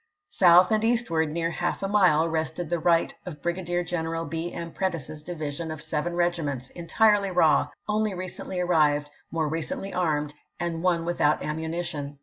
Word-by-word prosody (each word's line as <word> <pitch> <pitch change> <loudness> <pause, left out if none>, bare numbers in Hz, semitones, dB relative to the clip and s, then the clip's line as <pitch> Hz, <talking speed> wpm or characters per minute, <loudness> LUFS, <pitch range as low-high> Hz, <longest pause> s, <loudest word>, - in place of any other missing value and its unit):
South 180 +1 +6
and 215 0 +2
eastward 225 -10 +1
near 165 +1 -1
half 175 +3 -2
a - - +1
mile 180 -6 +4
rested 160 +1 -2
the 175 - +1
right 165 0 +2
of 165 -5 -8
Brigadier 175 0 -1
General 165 -1 -3
B, 165 +2 -4
M. 170 -1 -6
Prentiss's 165 -5 -3
division 155 -1 -5
of 155 -1 -5
seven 160 +3 -2
regiments, 155 -7 -1
entirely 200 +3 +2
raw, 160 -5 +4 0.2
only 215 -1 0
recently 185 0 -5
arrived, 150 -4 +2 0.2
more 160 -2 -1
recently 195 - -4
armed, 150 -4 0 0.3
and 170 -1 -2
one 170 -2 +1
without 155 -3 +1
ammunition. 160 -2 -4
170 Hz, 155 wpm, -26 LUFS, 155-180 Hz, 0.3 s, South